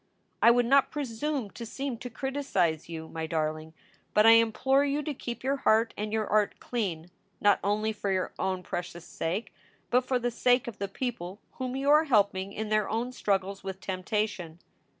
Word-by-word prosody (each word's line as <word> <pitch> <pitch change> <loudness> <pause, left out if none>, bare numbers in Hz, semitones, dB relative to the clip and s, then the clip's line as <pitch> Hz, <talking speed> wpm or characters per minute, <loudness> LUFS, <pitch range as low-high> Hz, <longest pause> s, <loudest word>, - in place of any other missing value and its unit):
"I - - +8
would 240 0 +4
not 275 +2 +4
presume 275 -3 -3
to 235 - -8
seem 255 +1 -4
to 250 - -6
criticize 220 - -1
you, 160 -1 -6
my 160 0 -5
darling, 155 0 -2 0.4
but 210 - +6
I 225 - +9
implore 230 +5 +4
you 285 +1 0
to 300 - -3
keep 240 -2 -6
your 275 +2 +1
heart 225 -2 +3
and 210 0 -4
your 220 0 0
art 210 0 +1
clean, 180 -8 -3 0.3
not 205 -1 +4
only 215 +2 0
for 205 -1 -3
your 185 -1 -1
own 185 -1 -1
precious 175 -1 -5
sake, 180 +8 -3 0.4
but 250 - +5
for 255 0 0
the 245 0 -1
sake 245 +1 +2
of 235 - -7
the 200 - -2
people 195 -4 -4 0.2
whom 255 0 -3
you 275 +2 +2
are 305 +2 +6
helping 200 -7 +2
in 215 +1 -4
their 215 -1 +1
own 235 +3 -1
struggles 195 -4 -1
with 190 0 -5
temptation. 185 -3 -3
215 Hz, 190 wpm, -28 LUFS, 190-250 Hz, 0.4 s, I